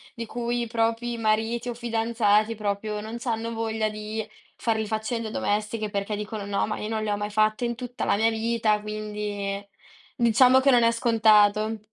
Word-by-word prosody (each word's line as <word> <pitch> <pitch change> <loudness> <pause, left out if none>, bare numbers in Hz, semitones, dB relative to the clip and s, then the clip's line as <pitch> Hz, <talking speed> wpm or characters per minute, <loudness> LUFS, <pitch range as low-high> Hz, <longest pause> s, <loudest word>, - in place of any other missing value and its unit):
di 230 - -5
cui 240 +1 -2
i 235 - -2
propri 230 +1 -1
mariti 225 +2 0
o 240 - -4
fidanzati, 225 -2 +1
proprio, 210 0 -2
non 220 +2 -6
c'hanno 230 -1 -2
voglia 225 -1 -1
di 215 +1 -5 0.3
far 225 -2 0
le 220 -1 -2
faccende 220 +1 -2
domestiche, 215 0 -2
perché 200 +1 -2
dicono: 210 0 -5
“No, 200 -1 0
ma 215 - -4
io 210 - -4
non 220 -1 -2
le 210 - -1
ho 205 - 0
mai 205 0 -3
fatte 215 +2 +1
in 235 0 -2
tutta 250 0 -5
la - - +3
mia 225 +2 +2
vita” 225 -1 +1
quindi, 210 -1 -4 0.5
diciamo 255 +2 +5
che 275 +1 +4
non 245 -2 +5
è 230 0 +4
scontato. 220 -2 +3
220 Hz, 185 wpm, -25 LUFS, 210-230 Hz, 0.5 s, diciamo